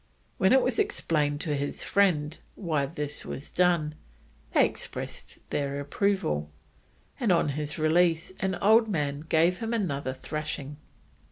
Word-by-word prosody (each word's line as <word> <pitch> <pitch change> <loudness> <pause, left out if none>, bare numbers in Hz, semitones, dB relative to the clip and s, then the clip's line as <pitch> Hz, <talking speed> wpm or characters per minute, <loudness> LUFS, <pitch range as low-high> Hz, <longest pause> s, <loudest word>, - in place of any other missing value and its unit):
When 190 - +4
it 265 0 +6
was - - 0
explained 150 - 0
to 150 -2 0
his 140 0 -3
friends 165 -6 +2 0.2
why 155 -7 0
this 145 -1 -5
was 140 - -7
done, 170 -4 +2 0.6
they - - +5
expressed - - -5
their 140 0 -1
approval, 140 - 0 0.7
and 230 -6 +2
on 165 -4 +3
his 150 +1 -3
release 165 +2 +2
an 190 -1 0
old 220 +5 +5
man 145 -7 -1
gave 165 +3 +2
him 225 +1 -1
another 140 - -2
thrashing. 150 0 -5
155 Hz, 140 wpm, -28 LUFS, 145-190 Hz, 0.7 s, it